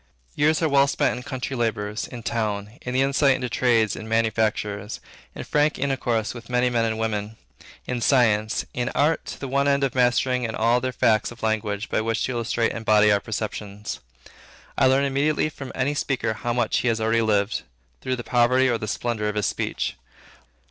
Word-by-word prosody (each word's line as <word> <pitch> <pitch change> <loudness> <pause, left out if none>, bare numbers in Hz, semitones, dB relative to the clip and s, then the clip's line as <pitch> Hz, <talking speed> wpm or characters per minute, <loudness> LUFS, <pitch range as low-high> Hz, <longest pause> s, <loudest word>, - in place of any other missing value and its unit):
Years 155 +3 +2
are - - +4
well 140 -1 +4
spent 140 - +1
in 125 - -6
country 130 0 -4
labors; 105 -3 -2
in 120 -2 -9
town, 105 -1 -3
in 125 0 -4
the 130 - +4
insight 135 0 +3
into 125 -1 -3
trades 115 -3 +2
and 110 - -8
manufactures; 110 -2 0 0.4
in - - -5
frank 150 +1 +1
intercourse 125 -5 -1
with 120 -1 -11
many 125 0 +2
men 115 -1 +1
and 110 -1 -1
women; 110 -1 -3 0.5
in 125 -1 -3
science; 110 -4 +2
in 120 +1 -1
art; 155 +3 +2
to - - -7
the 135 - -5
one 140 +2 +1
end 140 0 +2
of 135 - 0
mastering 125 0 +2
in 115 -2 -3
all 120 +2 +2
their 130 +1 -1
facts 110 -3 +2
a - - -9
language 110 -1 -1
by - - 0
which 115 0 -1
to - - -1
illustrate 115 -1 0
and - - -5
embody 105 -2 +4
our 100 - +4
perceptions. 105 -1 -5 0.8
I - - +4
learn 135 +1 +3
immediately 145 +3 +1
from 135 -3 -8
any 135 +3 0
speaker 135 -5 -1
how 120 +2 -3
much 120 -2 +1
he - - -1
has 115 -1 +1
already 110 +1 +2
lived, 105 -1 +1 0.4
through 130 - -1
the 120 - -6
poverty 125 +2 +3
or 120 -3 +1
the 110 - -4
splendor 110 -1 -2
of 105 - -4
his 105 - 0
speech. - - -2
120 Hz, 200 wpm, -24 LUFS, 110-130 Hz, 0.8 s, are